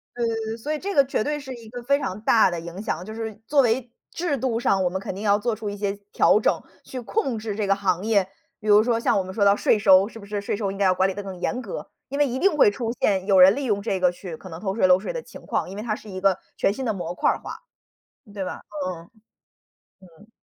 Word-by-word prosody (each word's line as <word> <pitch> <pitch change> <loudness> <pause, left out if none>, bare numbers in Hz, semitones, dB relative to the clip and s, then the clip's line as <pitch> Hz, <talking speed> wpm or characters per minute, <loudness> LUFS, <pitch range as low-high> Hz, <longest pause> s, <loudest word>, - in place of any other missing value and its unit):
对， 225 -2 -2
所 295 +7 -3
以 305 - -3
这 395 +3 -4
个 280 - +7
绝 260 - -1
对 295 +3 -1
是 270 -3 -7
一 230 -3 -11
个 245 0 -8
非 280 +3 +2
常 195 -6 -4
大 220 -2 +5
的 175 - -3
影 170 +3 -7
响， 175 -5 -3
就 215 - -7
是 220 -1 -5
作 285 -2 +4
为 240 0 0 0.2
制 330 -5 -1
度 250 -2 -1
上 195 -4 +2
我 180 - +2
们 190 - -3
肯 195 - -5
定 195 - -7
要 205 -1 +4
做 225 +3 -1
出 215 0 -4
一 205 - -5
些 200 -1 -1 0.2
调 - - +5
整， - - +1 0.3
去 255 - -6
控 260 - -1
制 215 -2 -4
这 210 -2 -1
个 195 - +4
行 190 -2 0
业。 205 -4 +3 0.4
比 215 - -7
如 210 0 +7
说 230 +1 +1
像 230 - +2
我 195 - +1
们 185 0 -8
说 205 - +1
到 200 0 +6
税 220 - +3
收， 195 -2 +6
是 230 - -11
不 205 - -11
是？ 205 0 -3
税 200 - -2
收 200 -2 -2
应 195 - -7
该 200 - +2
要 185 - +5
管 190 +1 +3
理 - - -3
得 205 - -5
更 195 -2 -7
严 250 +7 -2
格， 215 -7 -7 0.2
因 280 - -4
为 290 - +4
一 260 -1 -3
定 390 -1 +3
会 270 -8 +6
出 230 +2 -3
现 190 -2 +2
有 195 -1 +4
人 185 +1 +9
利 285 - -2
用 205 -4 0
这 200 -3 -1
个 180 0 +4
去 175 -2 -8
可 185 - -12
能 165 -2 -8
偷 195 -2 -2
税 195 -3 +3
漏 180 0 +6
税 - - -4
的 - - -4
情 - - -13
况， - - -1
因 195 - -8
为 210 - -5
它 225 -2 -1
是 215 - -8
一 185 -1 -6
个 195 -2 +3 0.2
全 - - +2
新 260 +6 -4
的 220 - 0
模 175 -3 -4
块 - - +1
儿 - - +1
化， - - -8 0.8
对 195 -2 -3
吧？ 180 - -6 0.3
嗯， 170 -2 -7 0.9
嗯。 185 +3 -18
210 Hz, 310 characters per minute, -24 LUFS, 190-235 Hz, 0.9 s, 人